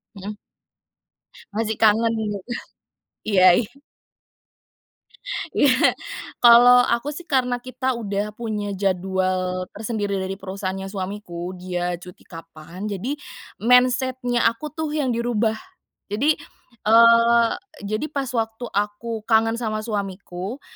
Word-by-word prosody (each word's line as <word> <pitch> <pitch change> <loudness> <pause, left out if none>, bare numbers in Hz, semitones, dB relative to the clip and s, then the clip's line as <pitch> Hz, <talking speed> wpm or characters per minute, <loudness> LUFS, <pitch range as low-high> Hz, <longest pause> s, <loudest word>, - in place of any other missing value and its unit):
Hmm. 200 +2 -6 1.2
Masih 220 0 -1
kangen, 225 +1 +4 0.2
gitu? 200 - -3 0.9
Iya 190 -3 +4
iya. 225 -3 -1 1.8
Iya. 260 -2 +4 0.5
Kalau 245 +1 +8
aku 235 +5 0
sih, 345 +4 -9
karena 250 -3 +1
kita 255 +1 -2
udah 205 -1 -2
punya 210 -2 -4
jadwal 185 -1 -1
tersendiri 210 -2 -2
dari 190 0 -3
perusahaannya 195 0 -4
suamiku, 185 -3 -5
dia 180 -1 -3
cuti 180 0 -13
kapan. 165 +4 -9
Jadi, 230 +9 -3 0.4
mindset-nya 250 +1 +3
aku 230 +7 -3
tuh 310 -1 -3
yang 280 -5 0
dirubah. 230 -2 0 0.5
Jadi, 270 +10 +1 0.5
eee, 230 +1 +6 0.3
jadi, 215 +6 -2
pas 275 -3 -2
waktu 225 -1 -2
aku 210 +2 -3
kangen 225 0 +3
sama 215 -2 -2
suamiku. 200 +1 -5
220 Hz, 105 wpm, -22 LUFS, 195-240 Hz, 1.8 s, Kalau